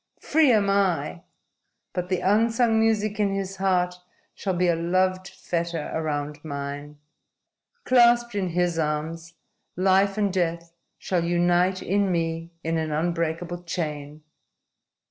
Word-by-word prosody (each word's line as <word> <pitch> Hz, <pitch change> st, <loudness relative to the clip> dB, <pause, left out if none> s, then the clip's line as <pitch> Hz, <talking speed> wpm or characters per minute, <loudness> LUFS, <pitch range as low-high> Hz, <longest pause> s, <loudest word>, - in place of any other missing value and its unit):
Free 305 Hz, -3 st, +3 dB
am 210 Hz, -3 st, +3 dB
I! 185 Hz, -, 0 dB, 0.7 s
But 180 Hz, 0 st, -3 dB
the 185 Hz, -, 0 dB
unsung 225 Hz, +3 st, +3 dB
music 215 Hz, -1 st, +1 dB
in 200 Hz, -2 st, +1 dB
his 195 Hz, 0 st, -4 dB
heart 180 Hz, -2 st, +1 dB, 0.4 s
shall 190 Hz, -3 st, -3 dB
be 180 Hz, +1 st, +2 dB
a 170 Hz, -, +3 dB
loved 185 Hz, +2 st, 0 dB
fetter 170 Hz, -4 st, -4 dB
around 150 Hz, -2 st, -3 dB
mine. 145 Hz, 0 st, -6 dB, 0.9 s
Clasped 240 Hz, -, +4 dB
in 195 Hz, -3 st, -1 dB
his 175 Hz, -1 st, 0 dB
arms, 160 Hz, +2 st, -3 dB, 0.4 s
life 195 Hz, +2 st, +3 dB
and 200 Hz, -3 st, +1 dB
death 170 Hz, -2 st, -2 dB, 0.2 s
shall 180 Hz, -3 st, -1 dB
unite 175 Hz, +2 st, +2 dB
in 200 Hz, 0 st, +1 dB
me 165 Hz, -1 st, -2 dB
in 165 Hz, 0 st, 0 dB
an 160 Hz, -1 st, -2 dB
unbreakable 170 Hz, +2 st, -2 dB
chain. 150 Hz, -3 st, -5 dB
175 Hz, 125 wpm, -25 LUFS, 165-195 Hz, 0.9 s, Clasped